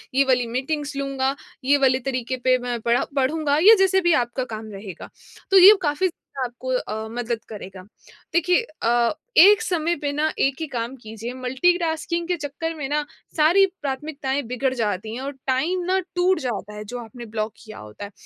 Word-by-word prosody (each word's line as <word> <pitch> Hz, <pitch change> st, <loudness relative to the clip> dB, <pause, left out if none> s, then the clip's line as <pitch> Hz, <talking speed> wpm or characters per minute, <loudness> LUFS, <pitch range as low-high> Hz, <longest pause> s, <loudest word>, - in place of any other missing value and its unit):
ये 275 Hz, -, +5 dB
वाली 250 Hz, -2 st, +2 dB
मीटिंग्स 290 Hz, +2 st, -3 dB
लूँगा, 275 Hz, -1 st, -1 dB, 0.3 s
ये 280 Hz, +2 st, +4 dB
वाले 260 Hz, 0 st, +3 dB
तरीके 255 Hz, -1 st, -2 dB
पे 255 Hz, 0 st, +5 dB
मैं 240 Hz, -1 st, -2 dB
पढ़ा 235 Hz, +3 st, +2 dB
पढ़ूँगा।" 285 Hz, +2 st, +1 dB
या 450 Hz, -, +10 dB
जैसे 380 Hz, 0 st, +4 dB
भी 345 Hz, -2 st, +3 dB
आपका 240 Hz, +2 st, -4 dB
काम 215 Hz, 0 st, -8 dB
रहेगा। 195 Hz, -3 st, -9 dB, 0.4 s
तो 390 Hz, -, +7 dB
ये 380 Hz, +3 st, +10 dB
काफ़ी 300 Hz, +3 st, +1 dB
ज़्यादा 350 Hz, -, -8 dB, 0.3 s
आपको 245 Hz, +2 st, -9 dB
अ, 220 Hz, -3 st, -3 dB
मदद 235 Hz, -1 st, -3 dB
करेगा। 195 Hz, -3 st, -9 dB, 0.5 s
देखिए 355 Hz, +5 st, +3 dB, 0.2 s
अ, 235 Hz, +2 st, +2 dB, 0.2 s
एक 410 Hz, +5 st, +8 dB
समय 345 Hz, -4 st, 0 dB
पे 285 Hz, -1 st, -1 dB
ना, 305 Hz, +2 st, 0 dB
एक 270 Hz, 0 st, +2 dB
ही 320 Hz, -, -2 dB
काम 245 Hz, -1 st, -4 dB
कीजिए, 225 Hz, +2 st, -7 dB
मल्टीटास्किंग 330 Hz, +6 st, 0 dB
के 360 Hz, -, +1 dB
चक्कर 300 Hz, +3 st, -4 dB
में 290 Hz, -4 st, -4 dB
ना, 295 Hz, 0 st, 0 dB, 0.3 s
सारी 340 Hz, +6 st, +5 dB, 0.2 s
प्राथमिकताएँ 280 Hz, 0 st, -3 dB
बिगड़ 260 Hz, +1 st, 0 dB
जाती 220 Hz, -3 st, -2 dB
हैं 255 Hz, -, -5 dB
और 275 Hz, +1 st, -4 dB, 0.2 s
टाइम 320 Hz, +8 st, 0 dB
ना 375 Hz, +1 st, +2 dB, 0.2 s
टूट 360 Hz, +1 st, +2 dB
जाता 225 Hz, -5 st, -4 dB
है, 210 Hz, -, -6 dB
जो 245 Hz, +3 st, -6 dB
आपने 235 Hz, +2 st, -10 dB
ब्लॉक 215 Hz, -1 st, -3 dB
किया 215 Hz, -1 st, -11 dB
होता 105 Hz, -, -9 dB
है। 200 Hz, -, -11 dB
265 Hz, 185 wpm, -23 LUFS, 235-320 Hz, 0.5 s, या